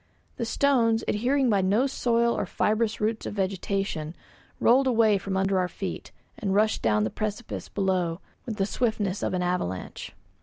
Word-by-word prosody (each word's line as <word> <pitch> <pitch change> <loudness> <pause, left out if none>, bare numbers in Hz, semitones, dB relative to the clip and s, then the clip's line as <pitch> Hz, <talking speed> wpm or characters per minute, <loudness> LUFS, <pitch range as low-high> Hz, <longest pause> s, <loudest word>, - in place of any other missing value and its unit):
The 235 - -2
stones, 230 -3 +2
adhering 255 +5 +1
by 205 -4 +3
no 205 +7 +2
soil 235 -3 +1
or - - -2
fibrous 220 +1 0
roots 220 +1 -1
of - - -5
vegetation, 190 -4 -2 0.4
rolled 265 +3 +4
away 220 -5 +4
from 190 0 -3
under 195 0 +2
our 180 - +1
feet, - - -6 0.3
and 195 -3 -1
rushed 215 +1 +2
down 105 -1 +2
the 110 - -1
precipice 215 +2 -4
below 185 -4 0 0.3
with 225 - -3
the 195 -2 0
swiftness 205 -4 -1
of - - -1
an 180 - 0
avalanche. 175 - -3
210 Hz, 165 wpm, -26 LUFS, 190-230 Hz, 0.4 s, rolled